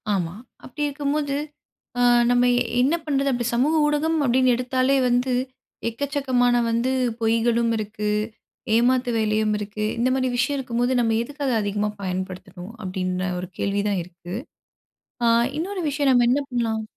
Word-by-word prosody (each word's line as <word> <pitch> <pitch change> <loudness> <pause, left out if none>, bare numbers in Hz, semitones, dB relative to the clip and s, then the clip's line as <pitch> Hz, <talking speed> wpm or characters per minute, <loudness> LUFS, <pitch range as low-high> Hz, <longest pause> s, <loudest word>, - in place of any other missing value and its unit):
ஆமா. 175 -2 -2 0.3
அப்டி 295 +3 -5
இருக்கும்போது 285 0 -1 0.6
அ, - - +2 0.3
நம்ம 245 0 +4 0.4
என்ன 280 +6 +3
பண்றது? 280 -2 +1
அப்டி 240 -2 -1
சமூக 270 +7 +2
ஊடகம் 300 +2 +1
அப்டின்னு 255 0 +3
எடுத்தாலே 255 +2 +1
வந்து 245 +1 +1 0.6
எக்கச்சக்கமான 260 -1 +1
வந்து 235 +3 +1 0.3
பொய்களும் 230 +1 +2
இருக்கு, 210 0 -3 0.7
ஏமாத்து 245 +1 +2
வேலையும் 215 -1 +1
இருக்கு. 210 +1 -4
இந்த 240 +2 +2
மாரி 255 -1 0
விஷயம் 280 +3 +1
இருக்கும்போது 245 0 0
நம்ம 225 -2 +2
எதுக்கு 290 +3 -7
அத 250 - +1
அதிகமா 205 +1 -1
பயன்படுத்தணும்? 185 +1 -5
அப்டின்ன 185 0 -2
1 180 0 -6
கேள்வி 200 0 0
தான் 200 -2 0
இருக்கு. 175 +1 -9 0.9
அ, - - +4 0.3
இன்னொரு 370 +2 -3
விஷயம் 285 -1 +2
நம்ம 245 -2 +4
என்ன 275 +4 +2
பண்ணலாம்? 230 -3 -1
240 Hz, 140 wpm, -23 LUFS, 210-265 Hz, 0.9 s, நம்ம